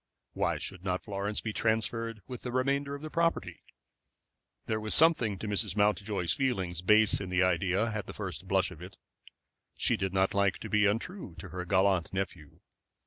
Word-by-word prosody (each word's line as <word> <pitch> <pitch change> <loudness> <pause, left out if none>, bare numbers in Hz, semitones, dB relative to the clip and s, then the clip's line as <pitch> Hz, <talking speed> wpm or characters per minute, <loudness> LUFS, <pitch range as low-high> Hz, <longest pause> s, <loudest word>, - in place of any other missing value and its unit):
Why - - 0
should 95 -2 -5
not 90 -1 -2
Florence 100 0 -3
be 110 - -4
transferred 115 0 -1
with 125 -2 -7
the 125 - -5
remainder 140 +2 0
of 145 - -10
the 155 - -6
property? 165 0 0 1.0
There 110 0 -1
was 110 0 +2
something 135 -11 +4
to 110 - -6
Mrs. 105 -1 0
Mountjoy's 105 -3 +1
feelings 95 -11 -1
base 105 +3 +4
in 95 - -5
the 90 0 +2
idea 95 +4 +1
at 105 -1 -4
the - - -7
first 95 -2 -6
blush 95 -1 +1
of 85 -3 -11
it. 90 +2 -10 0.8
She - - +2
did 95 -1 -2
not 95 0 +1
like 100 -1 +2
to - - -8
be 105 -1 +4
untrue 115 - -3
to - - -9
her 90 -1 -5
gallant 95 -2 +2
nephew. 90 -6 -5
105 Hz, 185 wpm, -30 LUFS, 95-115 Hz, 1.0 s, something